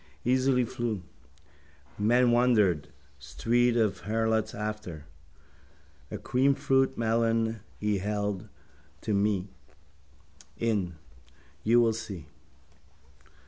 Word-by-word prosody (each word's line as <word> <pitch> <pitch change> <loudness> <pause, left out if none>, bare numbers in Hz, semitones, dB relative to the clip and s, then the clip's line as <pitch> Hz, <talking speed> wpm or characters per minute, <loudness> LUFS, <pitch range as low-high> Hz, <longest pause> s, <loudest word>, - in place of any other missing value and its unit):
Easily 130 0 +3
flew. 115 -5 -3 0.9
Men 120 +4 +3
wondered. 110 - +3 0.3
Street 115 - +1
of 110 -4 +1
harlots 110 0 0
after. 105 -8 -5 1.0
A - - -5
creamfruit 135 0 +2
melon 115 0 +1 0.2
he 105 -2 0
held 100 -1 -2 0.5
to 110 - -2
me. 100 -1 +1 1.1
In. 100 -7 -1 0.7
You 120 +2 +5
will 115 -1 +3
see. 100 -7 -7
110 Hz, 85 wpm, -28 LUFS, 100-120 Hz, 1.1 s, You